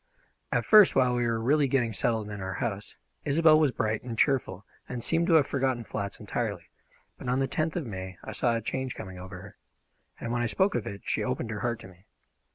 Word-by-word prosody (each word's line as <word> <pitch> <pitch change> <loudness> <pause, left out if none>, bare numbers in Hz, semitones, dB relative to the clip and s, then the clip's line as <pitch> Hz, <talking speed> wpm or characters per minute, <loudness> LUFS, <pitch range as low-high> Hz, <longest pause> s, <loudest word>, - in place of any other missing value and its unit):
At - - +1
first, 210 -3 +7
while 125 -2 +4
we 120 -1 +1
were 115 -1 0
really 140 +5 +3
getting 125 -4 +1
settled 110 -1 0
in 105 -1 -6
our 95 -1 -4
house, 105 -2 -4 0.3
Isobel 155 +1 +5
was 155 -2 +4
bright 110 -3 -1
and 120 -3 -6
cheerful 105 -8 +1 0.2
and 125 -2 -5
seemed 165 +1 +1
to 170 - +3
have 155 -4 +6
forgotten 130 -4 -1
flats 100 -2 -5
entirely - - -4 0.5
but 125 - -5
on 125 - +2
the 135 - +2
tenth 155 +4 -1
of 170 -5 -2
May 95 -4 -6
I - - -6
saw 120 -2 +1
a 115 - -1
change 130 +3 -3
coming 95 -1 -8
over 90 +1 -8
her, 100 +2 -12 0.6
and 115 - -4
when 120 - 0
I 120 - +1
spoke 190 - +2
of 115 - -2
it 100 0 -7
she - - 0
opened 125 -3 -2
her 105 - -4
heart 120 +1 -1
to - - -10
me. 95 +2 -19
120 Hz, 230 wpm, -28 LUFS, 105-135 Hz, 0.6 s, first